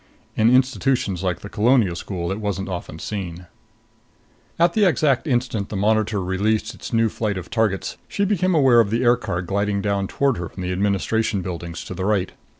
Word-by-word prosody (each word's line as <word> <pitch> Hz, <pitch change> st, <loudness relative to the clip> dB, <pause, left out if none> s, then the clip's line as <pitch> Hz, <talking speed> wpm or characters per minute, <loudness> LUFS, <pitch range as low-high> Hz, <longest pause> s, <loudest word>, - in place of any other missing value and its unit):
In 110 Hz, +1 st, +4 dB
institutions 125 Hz, -6 st, +2 dB
like 90 Hz, -2 st, -2 dB
the -, -, -7 dB
Colonial 110 Hz, -3 st, +2 dB
School 85 Hz, 0 st, -4 dB
it 100 Hz, -, -3 dB
wasn't 100 Hz, -2 st, -3 dB
often 90 Hz, -3 st, -5 dB
seen. 90 Hz, -1 st, -5 dB, 1.1 s
At 170 Hz, +1 st, +3 dB
the 215 Hz, -, +3 dB
exact 155 Hz, -6 st, +2 dB
instant 120 Hz, -6 st, -1 dB
the -, -, -5 dB
monitor 105 Hz, 0 st, +1 dB
released 100 Hz, +4 st, 0 dB
its -, -, -9 dB
new 115 Hz, -1 st, +3 dB
flight 105 Hz, -2 st, -2 dB
of 90 Hz, -1 st, -8 dB
targets, 110 Hz, -4 st, 0 dB
she 200 Hz, -, -1 dB
became 185 Hz, -3 st, +1 dB
aware 130 Hz, -6 st, +5 dB
of 110 Hz, -3 st, +3 dB
the 115 Hz, +4 st, 0 dB
aircar 120 Hz, -7 st, +1 dB
gliding 100 Hz, +2 st, -1 dB
down 100 Hz, -1 st, -1 dB
toward 140 Hz, +1 st, +1 dB
her 85 Hz, -1 st, -4 dB
from 90 Hz, +1 st, -8 dB
the 90 Hz, -, -2 dB
administration 100 Hz, +2 st, 0 dB
buildings 85 Hz, -1 st, -6 dB
on -, -, -4 dB
the 95 Hz, -, -2 dB
right. 100 Hz, -3 st, +1 dB
105 Hz, 185 wpm, -22 LUFS, 95-120 Hz, 1.1 s, aware